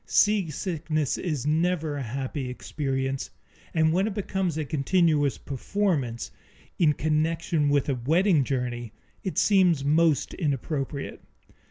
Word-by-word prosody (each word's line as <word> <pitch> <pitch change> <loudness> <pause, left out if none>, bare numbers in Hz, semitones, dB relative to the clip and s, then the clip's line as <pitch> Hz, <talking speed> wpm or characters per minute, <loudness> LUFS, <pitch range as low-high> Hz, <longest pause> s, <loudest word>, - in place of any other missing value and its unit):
Seasickness 165 -6 +1
is 150 -7 -2
never 160 0 +1
a 140 - -3
happy 130 +2 -4
experience, 135 0 -3 0.4
and 160 -1 +2
when 190 +4 +2
it 210 - -4
becomes 190 -5 -1
a 155 - -1
continuous 150 -1 +2
performance, 140 - -2 0.5
in 155 -4 +5
connection 155 0 0
with 145 -2 +2
a 140 - +1
wedding 160 - +3
journey, 125 -3 -3 0.3
it 190 - -4
seems 180 -8 +4
most 155 0 +3
inappropriate. 140 -2 -3
155 Hz, 120 wpm, -26 LUFS, 135-170 Hz, 0.5 s, in